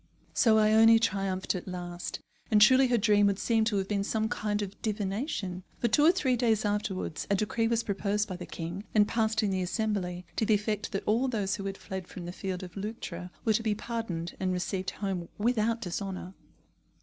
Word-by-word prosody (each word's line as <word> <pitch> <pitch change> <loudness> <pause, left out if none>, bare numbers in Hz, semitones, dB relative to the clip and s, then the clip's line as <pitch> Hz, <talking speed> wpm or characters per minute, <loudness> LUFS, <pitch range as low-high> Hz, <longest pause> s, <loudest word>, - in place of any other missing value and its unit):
So 220 -2 +4
Ione 220 +1 +6
triumphed 195 -4 0
at 185 -1 -5
last. 175 -1 -5 0.3
And 210 - +5
truly 260 +5 +7
her 245 -1 +3
dream 205 -1 +4
would 200 -1 +1
seem 225 +1 +2
to 215 -2 +1
have 190 -1 -1
been 200 -1 0
some 220 +1 -1
kind 210 -3 -1
of 200 0 -8
divination, 205 - -2 0.2
for, 235 - 0
two 290 +7 +4
or 325 - +8
three 285 -9 +1
days 225 -3 +2
afterwards, 205 -5 -2
a 200 - +3
decree 220 +3 0
was 230 0 +1
proposed 205 +1 -1
by 185 - -5
the 180 0 -8
king, 170 +4 -5
and 210 -1 +5
passed 220 -1 +1
in 205 - +1
the 190 -1 0
Assembly, 180 -2 -2
to - - +2
the 215 0 +4
effect 210 0 -2
that 195 - -2
all 235 +5 +2
those 205 -5 -1
who 195 - -6
had 195 0 -4
fled 190 -1 -6
from 180 -3 -8
the 175 - -5
field 185 0 -4
of 180 -1 -9
Leuctra 195 -4 -5 0.2
were 220 - +4
to 220 - +1
be 220 -2 0
pardoned 205 -7 -4
and 185 -1 0
received 185 +1 -2
home 190 -4 -4
without 230 +1 +1
dishonour. 185 0 -4
205 Hz, 210 wpm, -29 LUFS, 190-220 Hz, 0.3 s, or